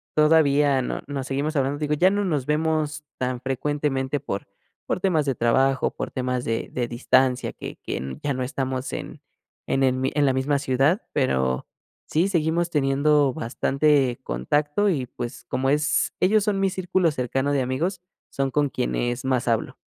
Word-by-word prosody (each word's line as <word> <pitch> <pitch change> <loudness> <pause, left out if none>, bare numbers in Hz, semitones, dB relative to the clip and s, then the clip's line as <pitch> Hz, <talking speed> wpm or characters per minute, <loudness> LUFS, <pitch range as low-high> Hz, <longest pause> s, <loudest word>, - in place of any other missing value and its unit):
todavía 150 -3 +4
no - - -3
nos 135 -2 -4
seguimos 145 +3 -2
hablando, 140 +1 0
digo, 150 0 0
ya 180 +5 +4
no 205 +1 0
nos 150 -8 -1
vemos 155 -1 0
tan 125 -1 -2
frecuentemente 135 +1 -1
por 100 -8 -5 0.4
por - - -1
temas 175 -6 +1
de 135 - +1
trabajo, 130 +3 +2
por - - -4
temas 125 -1 -2
de 115 0 -2
de 120 -1 -2
distancia 130 +1 +2
que - - -8
que 65 0 -5
ya 145 - -1
no 130 0 -2
estamos 130 0 -3
en - - -6 0.4
en 135 - 0
el 130 -1 +4
mi 130 +1 -1
en 145 -1 +2
la 135 - +3
misma 140 +2 +1
ciudad, 140 - +2
pero 65 - +1 0.4
sí, 165 +5 +1
seguimos 170 -1 +1
teniendo 145 -1 +2
bastante 135 +2 +1
contacto 145 - 0
y, 140 -9 0
pues, 120 0 -7
como 135 +1 -1
es 150 +1 +1
ellos 205 +2 +3
son 205 -2 0
mi 195 0 +2
círculo 180 -2 +1
cercano 135 +2 -1
de 140 - +2
amigos, 165 +9 -2 0.3
son 135 -1 -1
con 145 0 +2
quienes 120 -1 -2
más 130 -2 0
hablo. 115 -2 0
140 Hz, 170 wpm, -24 LUFS, 130-150 Hz, 0.4 s, todavía